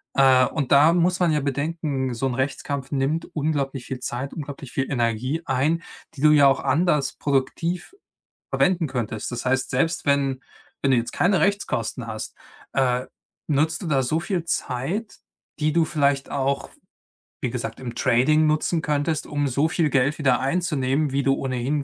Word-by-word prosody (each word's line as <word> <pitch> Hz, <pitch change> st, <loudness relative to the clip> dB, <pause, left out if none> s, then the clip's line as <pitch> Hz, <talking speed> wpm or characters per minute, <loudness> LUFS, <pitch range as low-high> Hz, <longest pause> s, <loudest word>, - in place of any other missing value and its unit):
äh, 130 Hz, -1 st, +6 dB
und 140 Hz, -5 st, -3 dB
da 150 Hz, +4 st, +6 dB
muss 180 Hz, +1 st, +2 dB
man 175 Hz, -3 st, +3 dB
ja 150 Hz, -, +1 dB
bedenken, 140 Hz, -2 st, -2 dB
so 120 Hz, +3 st, -2 dB
'n 125 Hz, -, -2 dB
Rechtskampf 135 Hz, +1 st, -3 dB
nimmt 145 Hz, +4 st, 0 dB
unglaublich 140 Hz, -4 st, -1 dB
viel 130 Hz, -, -5 dB
Zeit, 130 Hz, +3 st, -4 dB
unglaublich 140 Hz, -4 st, -7 dB
viel 130 Hz, +1 st, -2 dB
Energie 125 Hz, +4 st, 0 dB
ein, 150 Hz, +6 st, +1 dB, 0.3 s
die 135 Hz, -, -9 dB
du 150 Hz, 0 st, +6 dB
ja 145 Hz, -2 st, +7 dB
auch 135 Hz, -, +3 dB
anders 150 Hz, -4 st, +1 dB
produktiv 165 Hz, -, -1 dB, 0.6 s
verwenden 175 Hz, -4 st, +2 dB
könntest. 115 Hz, -3 st, -3 dB
Das 120 Hz, -, -5 dB
heißt, 130 Hz, +1 st, +1 dB
selbst 150 Hz, +6 st, 0 dB
wenn 140 Hz, -2 st, +1 dB, 0.4 s
wenn 140 Hz, -, +2 dB
du 130 Hz, -, +4 dB
jetzt 115 Hz, -, -1 dB
keine 190 Hz, 0 st, +2 dB
Rechtskosten 165 Hz, -, -1 dB
hast, 110 Hz, -1 st, -6 dB, 0.4 s
äh, 125 Hz, -1 st, +1 dB, 0.4 s
nutzt 155 Hz, +4 st, +1 dB
du 175 Hz, -, -5 dB
da 135 Hz, -3 st, +2 dB
so 155 Hz, +6 st, 0 dB
viel 180 Hz, -2 st, -2 dB
Zeit, 170 Hz, -, -3 dB, 0.4 s
die 155 Hz, 0 st, +1 dB
du 170 Hz, 0 st, +4 dB
vielleicht 140 Hz, -3 st, 0 dB
auch, 140 Hz, 0 st, -1 dB, 0.7 s
wie -, -, -1 dB
gesagt, -, -, -5 dB
im 120 Hz, -2 st, -5 dB
Trading 130 Hz, +7 st, +3 dB
nutzen 155 Hz, +2 st, +1 dB
könntest, 150 Hz, +1 st, -1 dB
um 145 Hz, -1 st, -1 dB
so 140 Hz, +4 st, +1 dB
viel 160 Hz, -2 st, +1 dB
Geld 140 Hz, +2 st, +2 dB
wieder 130 Hz, -5 st, +2 dB
einzunehmen, 140 Hz, -2 st, 0 dB
wie 140 Hz, +1 st, +1 dB
du 135 Hz, 0 st, +3 dB
ohnehin 135 Hz, +2 st, -2 dB
140 Hz, 170 wpm, -23 LUFS, 130-155 Hz, 0.7 s, ja